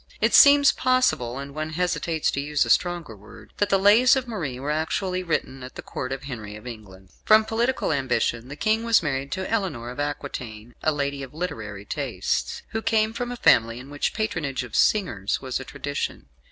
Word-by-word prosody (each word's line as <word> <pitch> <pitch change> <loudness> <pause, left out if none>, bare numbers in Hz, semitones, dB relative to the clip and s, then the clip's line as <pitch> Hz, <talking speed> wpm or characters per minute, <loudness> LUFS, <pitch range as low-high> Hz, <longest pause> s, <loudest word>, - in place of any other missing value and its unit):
It - - +2
seems 285 -1 +8
possible 255 - +1
(and 140 0 -7
one 155 +1 -4
hesitates 170 -2 0
to 140 - -2
use 150 0 +1
a - - 0
stronger 175 -10 +1
word) 105 +2 -15
that 205 - +1
the 195 - +4
"Lays" 220 +7 +6
of 260 -2 -2
Marie 155 - -4
were 140 +3 -2
actually 180 +4 -1
written 155 -6 -2
at 125 0 -9
the - - -8
Court 130 - -5
of 135 0 -4
Henry 110 -7 -7
of 105 - -12
England. 100 -5 -10
From 215 0 +6
political 230 -3 0
ambition 125 -3 0
the 140 - -8
King 220 +7 +1
was 230 -5 +4
married 140 -2 -2
to 190 -1 -3
Eleanor 175 - -2
of 125 - -9
Aquitaine, 120 -6 -5
a 155 - +2
lady 140 -1 -2
of 135 +1 -9
literary 110 - -5
tastes, - - -2
who 225 - -3
came 220 0 +1
from 245 +1 -4
a 245 - -5
family 115 - +4
in 130 +3 -10
which 145 - -1
the - - -12
patronage 150 - -2
of 120 -3 -8
singers 120 - +1
was 130 -1 -3
a - - -6
tradition. 145 - -4
145 Hz, 205 wpm, -24 LUFS, 125-200 Hz, -, seems